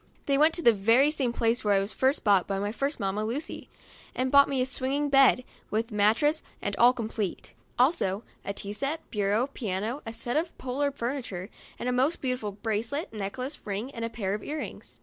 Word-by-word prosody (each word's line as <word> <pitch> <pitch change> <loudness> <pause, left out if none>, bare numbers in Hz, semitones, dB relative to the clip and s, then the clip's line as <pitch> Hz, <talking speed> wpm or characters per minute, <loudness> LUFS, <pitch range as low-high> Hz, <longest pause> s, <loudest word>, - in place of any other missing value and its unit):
They 280 - +2
went 310 +3 +4
to 340 - -2
the 235 - +7
very 230 +8 +4
same 270 -6 -1
place 235 0 +1
where 205 -1 +3
I - - +4
was 195 +2 -3
first 265 +3 +2
bought 200 -4 +4
by 195 - -1
my 205 +1 -2
first 275 +6 -2
mamma, 200 +2 -1
Lucy, 250 +8 -4 0.5
and 255 +1 0
bought 280 0 +7
me 275 -2 0
a 255 - +2
swinging 270 +3 0
bed, 270 -2 +5 0.3
with 225 +2 -1
mattress, 225 +10 +3 0.2
and 200 -1 -2
all 240 +1 +7
complete; 220 -5 -4 0.2
also 240 - +2 0.2
a - - -3
tea 200 0 -6
set, 285 +8 -3
bureau, 210 +2 +1
piano, 220 +4 -3
a 225 - -6
set 240 +4 -1
of 330 +2 -2
parlor 275 +3 -1
furniture, 235 -7 -4 0.3
and - - -4
a - - +2
most 265 +6 +1
beautiful 250 -6 -2
bracelet, 225 - -3
necklace, 250 +7 -4
ring, 210 +6 -4
and 230 -4 -6
a 230 - -1
pair 210 -4 -3
of 210 - -4
ear 300 - -4
rings. - - -8
240 Hz, 210 wpm, -28 LUFS, 210-275 Hz, 0.5 s, the